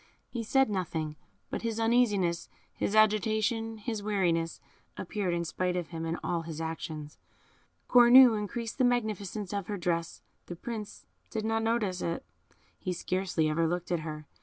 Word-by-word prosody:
He 235 - -3
said 270 +4 +3
nothing, 160 -6 -2 0.4
but - - -2
his 230 -1 -2
uneasiness, 210 -7 +2 0.2
his 205 - -1
agitation, 220 +1 +2
his 215 0 -4
weariness, 175 -5 0 0.4
appeared 200 -5 -2
in 170 0 -1
spite 180 +2 -1
of 175 -2 -3
him 165 -1 -4
in 165 +1 -1
all 170 -1 0
his 160 -1 -7
actions. 160 -2 -5 0.7
Cornue 245 0 +8
increased 220 +4 -4
the - - +4
magnificence 215 -5 -1
of 200 -2 -3
her 205 - -3
dress; 170 -2 -2 0.2
the 175 - -6
Prince 210 +2 -7 0.2
did 220 -1 -3
not 225 0 +1
notice 225 -5 0
it; 170 0 -2 0.5
he 185 - -2
scarcely 180 -2 0
ever 165 +2 +1
looked 175 +1 -3
at 175 - +1
her. 155 -1 -6
200 Hz, 160 wpm, -30 LUFS, 170-225 Hz, 0.7 s, Cornue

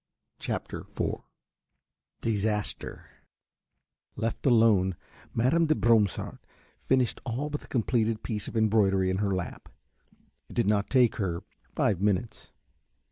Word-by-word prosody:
CHAPTER - - -4 0.2
IV - - 0 1.0
DISASTER 105 -1 -2 1.1
Left 115 0 -3
alone, 110 -6 +4 0.4
Mademoiselle 155 +8 +3
de 155 - +3
Bromsart 110 -3 +2 0.5
finished 130 -3 +2
the - - -5
all 145 +6 -2
but 150 - -5
completed 115 -2 0
piece 105 -4 -3
of - - -4
embroidery 100 -4 +3
in 95 - -1
her 100 0 0
lap. 90 -2 -5 0.8
It - - -11
did 120 - +2
not 100 0 +1
take 125 -3 +4
her 90 -3 -2 0.3
five 95 -4 +1
minutes. 105 +2 -1
110 Hz, 120 wpm, -28 LUFS, 100-120 Hz, 1.1 s, alone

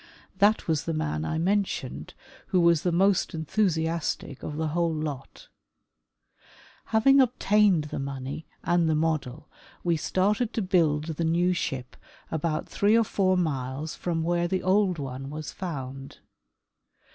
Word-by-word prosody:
That 205 +2 +3
was 160 -3 0
the 165 - -2
man 75 - -2
I 160 - -2
mentioned, 185 -6 -1 0.3
who 185 - +2
was 170 -2 +4
the 180 - 0
most 190 +1 +2
enthusiastic 160 -4 -1
of 150 - -5
the 160 0 -1
whole 170 +1 +1
lot. 150 -4 -5 1.4
Having 270 +5 +5
obtained 210 -8 +3
the 150 - -5
money 135 +2 -5 0.2
and 175 -2 +2
the 155 - +2
model, 155 -3 -1 0.4
we 170 -1 +2
started 210 +8 0
to 220 - -1
build 165 -6 +2
the 165 0 -3
new 175 +3 +2
ship 130 -7 -4 0.4
about 160 0 -1
three 210 +3 +3
or 230 - +4
four 185 -2 +1
miles 145 -2 -2
from 165 -2 -2
where 175 +1 +1
the 185 +1 -1
old 190 -1 +2
one 135 -1 -6
was 155 0 -6
found. 135 -7 -6
165 Hz, 145 wpm, -27 LUFS, 150-185 Hz, 1.4 s, Having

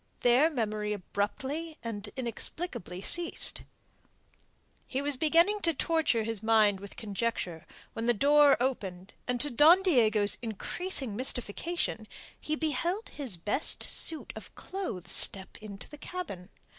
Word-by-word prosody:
There 250 +6 +5
memory 215 -6 -2
abruptly 270 - -4
and 210 -3 -5
inexplicably 235 - -4
ceased. 345 - +1 1.3
He 265 - -2
was 285 0 +1
beginning 335 +9 +3
to 330 -4 +1
torture 310 -7 +1
his 225 -2 -4
mind 215 -3 +3
with 200 0 -10
conjecture, 205 -6 -3 0.3
when 225 +1 -3
the 240 - +4
door 290 +4 +5
opened, 195 -7 -3
and 250 0 -1
to 295 - +1
Don 320 +9 +6
Diego's 220 - +3
increasing 245 - -3
mystification 245 +1 -1 0.3
he 305 - -2
beheld 335 - -2
his 260 - -4
best 205 - 0
suit 320 -2 +3
of - - -11
clothes 365 - -5
step 190 -1 +3
into 200 -2 -9
the 295 - -13
cabin. 205 - -7
245 Hz, 130 wpm, -29 LUFS, 210-310 Hz, 1.3 s, Don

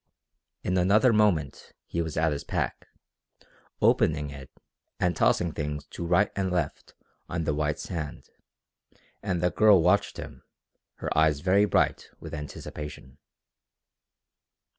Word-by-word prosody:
In 90 0 +1
another 105 +7 +4
moment 100 -10 +1
he 85 - -2
was 80 -2 -4
at 80 0 +2
his 70 - -3
pack, - - -3 1.0
opening 75 -2 +3
it, 65 -2 -10 0.5
and 90 -2 +1
tossing 85 +2 +2
things 75 -1 -4
to - - -6
right 90 +4 +3
and 95 -2 -1
left 90 -1 -3 0.3
on 85 - -2
the 75 -1 0
white 75 0 -1
sand, 80 -5 -6 0.9
and 90 -4 -2
the 90 - +3
girl 105 +1 +6
watched 90 +5 +2
him, - - -9 0.5
her - - -4
eyes 75 -2 +3
very 95 +3 +4
bright - - +1
with - - -9
anticipation. 75 -2 -8
85 Hz, 130 wpm, -27 LUFS, 75-95 Hz, 1.0 s, girl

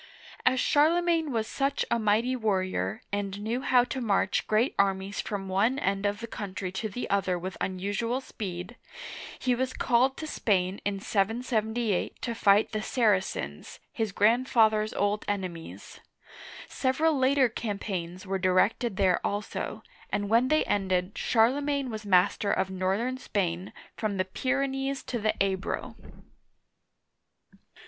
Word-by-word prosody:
As 260 - +4
Charlemagne 325 +1 +3
was 225 -3 0
such 275 +4 -1
a 235 - +2
mighty 220 +4 +2
warrior, 185 - -1
and 200 -1 -2
knew 225 +5 -2
how 250 -2 +4
to 260 +1 -4
march 200 -4 +1
great 220 +5 +2
armies 195 0 +1
from 200 -2 -4
one 205 +8 +2
end 195 -6 0
of 205 +2 -3
the - - -3
country 195 -4 -5
to 215 +4 -3
the 245 +5 -4
other 190 -2 +1
with 185 +2 -5
unusual 205 +6 -1
speed, 195 -3 -6 0.6
he 255 - +1
was 255 +1 -1
called 255 +2 +2
to 315 - -5
Spain, 195 -9 0
in 200 -1 -1
yy^y 220 0 0
to 235 - -3
fight 205 -1 +4
the 215 - -2
Saracens, 190 - -1
his 220 -2 -1
grandfather's 220 0 +3
old 205 +1 0
enemies. 185 -5 -5 0.7
Several 300 +4 +1
later 265 0 +4
campaigns 195 -5 -4
were 195 0 -2
directed 190 +4 +2
there 185 -3 +2
also, 210 +1 -3 0.3
and 200 0 -1
when 230 +3 +4
they 310 +3 +3
ended, 190 -1 0
Charlemagne 275 +3 +1
was 215 -1 -6
master 190 +2 +3
of 190 - 0
northern 195 +8 -1
Spain, 180 -4 -2 0.2
from 210 -3 -2
the 185 - +1
Pyrenees 270 +5 -1
to 240 - -3
the 215 0 +1
Ebro. 190 -1 -2
215 Hz, 140 wpm, -28 LUFS, 195-250 Hz, 0.7 s, As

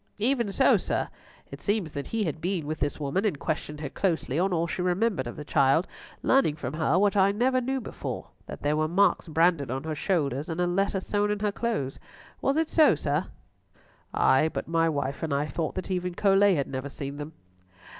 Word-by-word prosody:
"Even 235 -1 +1
so, - - +4
sir. - - -2 0.4
It - - -9
seems 200 -6 0
that 140 -1 -5
he 225 -1 -1
had 160 -3 -3
been 180 -3 -1
with 155 +1 -4
this 145 +1 -2
woman, 150 +7 -1
and 200 -9 0
questioned 150 0 -3
her 145 - -3
closely 165 -6 0
on 190 +2 +2
all 170 -1 +1
she 170 - -3
remembered 180 - 0
of 120 - -6
the 150 - -8
child, 140 +5 +3 0.4
learning 265 - +3
from 145 -3 -5
her 155 +1 +1
what 205 +1 +3
I 195 0 +5
never 255 +5 +2
knew 265 +2 -1
before, 240 - -6 0.2
that - - -8
there 145 +1 +2
were 155 0 +1
marks 185 +2 +2
branded 165 -3 +2
on 135 +2 -3
her 160 0 -3
shoulders 150 -4 -1
and 165 +1 -3
a 180 - +3
letter 195 +2 0
sewn 205 +1 0
in 210 0 -1
her 210 -1 +1
clothes. 200 - -2 0.4
Was 275 +2 +1
it 320 0 +2
so, 310 - +5
sir?" 150 +3 -1 0.8
"Ay, 145 +4 +3
but - - -4
my 165 0 +2
wife 140 -2 -2
and 160 -2 -2
I 140 +1 +1
thought 155 +1 -3
that 185 +1 -4
even 180 -1 -2
Colet 195 0 +4
had 140 -3 0
never 130 +1 -4
seen 140 0 -6
them." 150 +2 -7
170 Hz, 215 wpm, -27 LUFS, 150-200 Hz, 0.8 s, I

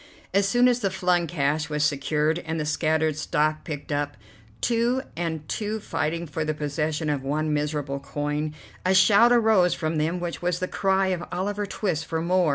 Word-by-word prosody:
As 200 0 +3
soon 245 +3 +4
as 245 -1 +3
the 200 -5 0
flung 180 -2 +1
cash 150 -1 0
was 150 -1 0
secured 150 +2 +1
and 160 -1 -4
the 155 - -1
scattered 155 0 +1
stock 155 -1 0
picked 150 -3 -6
up, 145 0 -1 0.4
two 240 +2 +1
and 160 -3 -3
two 215 0 -2
fighting 170 -3 -2
for 155 0 -3
the 155 0 -2
possession 150 +1 -2
of 145 -2 0
one 150 +3 -1
miserable 145 -2 -2
coin, 150 +2 -3 0.3
a 185 +1 +3
shout 205 +5 +6
arose 220 -7 +4
from 160 0 -2
them 165 +4 0
which 175 -1 -4
was 175 0 0
the 185 - -2
cry 190 0 +1
of 180 -2 -1
Oliver 205 +2 -2
Twist 175 -6 -2
for 160 - -1
"more." 175 0 +2
160 Hz, 185 wpm, -25 LUFS, 150-190 Hz, 0.4 s, shout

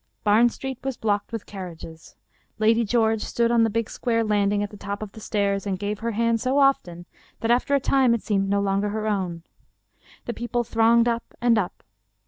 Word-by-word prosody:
Barn 220 +3 +5
Street 265 +1 -6
was 270 -2 -3
blocked 205 -2 -1
with 225 -3 -5
carriages. 170 -4 -10 0.4
Lady 225 +2 +3
George 220 -1 +1
stood 235 0 0
on 235 -1 +4
the 225 - +2
big 230 +1 -1
square 230 -2 -1
landing 205 -1 +1
at 205 - -5
the - - -10
top 200 +1 -5
of 210 - -8
the 220 - -12
stairs 200 -2 -1
and 190 -2 -1
gave 205 +1 -3
her 230 - -2
hand 230 +1 +1
so 260 +2 0
often 180 -12 +2 0.4
that 230 - +1
after 255 +4 +2
a - - +3
time 260 -3 +3
it 230 - -5
seemed 195 -3 0
no 200 0 +2
longer 200 +1 0
her 215 +1 -3
own. 185 -6 -2 0.8
The 240 - -3
people 240 +1 -2
thronged 230 +1 +3
up 235 0 -3
and 240 -1 +3
up. 200 -5 -2
220 Hz, 205 wpm, -24 LUFS, 200-235 Hz, 0.8 s, Barn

